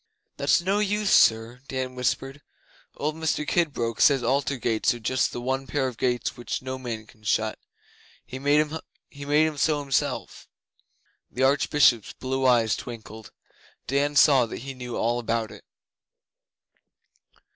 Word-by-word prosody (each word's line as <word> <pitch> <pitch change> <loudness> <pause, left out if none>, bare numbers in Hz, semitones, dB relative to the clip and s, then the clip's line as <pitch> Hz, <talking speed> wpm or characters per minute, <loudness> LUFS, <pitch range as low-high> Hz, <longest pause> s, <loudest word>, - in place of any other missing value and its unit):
'That's 140 +4 +3
no 195 +3 +1
use, 210 0 0
sir,' 115 +2 +4
Dan 130 -1 -4
whispered. 135 +2 -2 0.6
'Old 150 +1 -1
Mr 155 -1 -2
Kidbrooke 135 -9 0
says 135 -4 +5
Altar 140 +3 0
gates 115 0 0
are - - -9
just 130 +3 0
the - - -5
one 130 +2 -2
pair 135 -2 0
of 125 - -6
gates 120 0 -1
which 120 -1 -4
no 130 0 -5
man 115 -4 -5
can 110 0 -21
shut. 110 +1 -1 0.7
He 130 - -8
made 145 +2 +3 0.5
'em 145 +2 0
so 150 0 +2
himself.' 140 -2 -2 0.8
The 130 - -2
Archbishop's 135 -4 +3
blue 130 0 -1
eyes 115 -3 +3
twinkled. 110 -2 -9 0.5
Dan 140 +2 0
saw 135 -4 +5
that 110 - -7
he 135 - -5
knew 125 -2 -7
all 120 +2 0
about 115 -2 -2
it. - - -13
130 Hz, 145 wpm, -25 LUFS, 120-145 Hz, 0.8 s, says